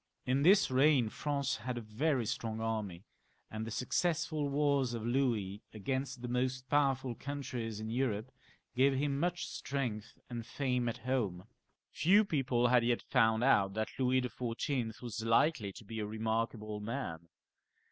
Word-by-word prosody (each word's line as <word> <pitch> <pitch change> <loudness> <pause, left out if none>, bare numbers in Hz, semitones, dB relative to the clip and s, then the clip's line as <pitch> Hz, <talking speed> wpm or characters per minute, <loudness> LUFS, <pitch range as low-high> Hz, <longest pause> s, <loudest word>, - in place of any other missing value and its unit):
In 130 +2 +2
this 185 -1 +5
reign 130 -3 +4
France 140 -1 -1
had 120 +2 -4
a - - -3
very 120 +4 0
strong 110 +1 -3
army, 105 -6 -3 0.5
and 110 +1 -4
the - - -3
successful 155 +4 0
wars 140 -3 +1
of 115 -1 -4
Louis 115 -6 0
against 130 +4 -3
the - - -2
most 130 +1 -1
powerful 135 -3 +2
countries 125 -5 -5
in 110 0 -4
Europe 120 -1 -1 0.4
gave 135 +2 +4
him 140 0 0
much 175 +2 0
strength 120 -7 -4
and 120 -2 -5
fame 125 0 -1
at 115 - -4
home. 105 -9 -1 0.5
Few 200 +6 +4
people 130 -8 +1
had 125 -1 +5
yet 120 0 +1
found 110 -2 +3
out 100 -7 +4
that 110 0 -1
Louis 130 0 +3
XIV. 120 -1 -3
was 115 -2 -4
likely 115 -2 +2
to 110 - -12
be 110 +2 -6
a 105 - -2
remarkable 110 0 -2
man. 105 -8 -5
125 Hz, 155 wpm, -33 LUFS, 110-135 Hz, 0.5 s, this